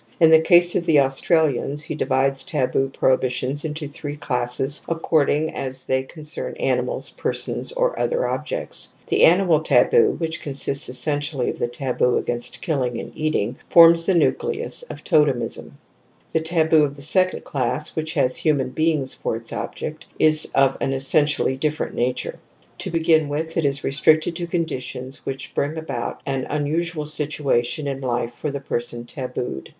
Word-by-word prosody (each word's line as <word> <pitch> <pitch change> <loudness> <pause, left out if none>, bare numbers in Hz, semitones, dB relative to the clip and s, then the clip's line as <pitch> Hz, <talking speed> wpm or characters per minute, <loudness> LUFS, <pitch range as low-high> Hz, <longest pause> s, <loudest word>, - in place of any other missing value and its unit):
In 165 -2 +6
the 160 - +8
case 175 +1 +5
of 170 - -1
the 150 -3 +5
Australians 140 +1 +1
he 155 - -5
divides 135 -1 0
taboo 135 -2 -1
prohibitions 130 +1 0
into 155 -1 -5
three^classesuw^pording 145 +2 -1
a^ 130 -1 -5
they 130 0 0
L^ 130 - -21
concern 155 -1 -5
aninmls^ - - -1
perswhs - - -1
or - - +1
om^ - - -1
objects* - - -5
"j - - 0
The - - +5
^ - - +10
animaltaboo, 195 - +3
which 160 -1 -3
consists 140 0 +3
essentially 145 0 +1
of - - -11
the - - 0
taboo 125 0 0
against 120 0 -2
killing 130 -8 -1
and - - -8
eating, 130 -7 -2
forms 165 0 +7
the 190 - +3
nucleus 465 - +2
pf - - -9
Totemism 140 - +1
•. - - -16 0.6
The 160 - 0
taboo 160 -1 +3
of 140 -1 -2
the 140 - -6
second 185 +4 +3
class, 130 +2 -2
which 160 0 -3
has 130 -5 +2
human 145 -5 0
beings 155 -3 0
for - - -3
its 115 0 -7
object, 155 +1 -6
is 155 -1 +4
of 135 -1 +3
an 135 - 0
essentially 140 0 +2
different 150 +2 -2
nature. 125 +1 -2 0.4
To - - -4
begin 160 -2 +2
with 160 +3 -3
it 165 - 0
is 140 0 0
restricted 155 +4 +2
to 175 - -4
conditions 135 -5 -4
which 135 0 -5
bring 145 +3 -2
about 140 -7 -5
an 135 -2 -3
unusual 155 +2 -2
situation 150 -3 0
in 135 -1 -4
life 120 -2 -2
for 150 - -5
the 140 -1 -5
person 120 -2 -3
tabooed. 125 - -6
145 Hz, 160 wpm, -21 LUFS, 130-160 Hz, 0.6 s, ^